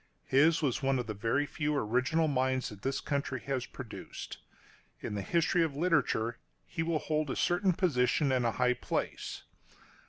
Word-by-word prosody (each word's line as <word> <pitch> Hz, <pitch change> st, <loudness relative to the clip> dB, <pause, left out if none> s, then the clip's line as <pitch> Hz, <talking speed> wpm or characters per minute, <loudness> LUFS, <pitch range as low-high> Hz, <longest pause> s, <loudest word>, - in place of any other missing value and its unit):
His 155 Hz, +5 st, +4 dB
was 135 Hz, 0 st, +1 dB
one 135 Hz, -1 st, +2 dB
of 125 Hz, -, -2 dB
the 110 Hz, -, -4 dB
very 115 Hz, +8 st, 0 dB
few 150 Hz, 0 st, -1 dB
original 140 Hz, +7 st, +1 dB
minds 130 Hz, -2 st, +1 dB
that 105 Hz, -2 st, -11 dB
this 135 Hz, +3 st, -1 dB
country 140 Hz, -2 st, -2 dB
has 130 Hz, -3 st, -2 dB
produced. 125 Hz, -5 st, -8 dB, 0.6 s
In -, -, -5 dB
the 100 Hz, -, -2 dB
history 170 Hz, -, +2 dB
of 160 Hz, -4 st, 0 dB
literature, 140 Hz, -8 st, +1 dB, 0.3 s
he 165 Hz, -, -4 dB
will 165 Hz, -1 st, +1 dB
hold 155 Hz, -1 st, -1 dB
a -, -, -1 dB
certain 180 Hz, +2 st, +2 dB
position 145 Hz, -4 st, +2 dB
and 130 Hz, -1 st, +2 dB
a 115 Hz, -1 st, +1 dB
high 125 Hz, 0 st, +3 dB
place. 125 Hz, -, -3 dB
135 Hz, 175 wpm, -31 LUFS, 125-160 Hz, 0.6 s, His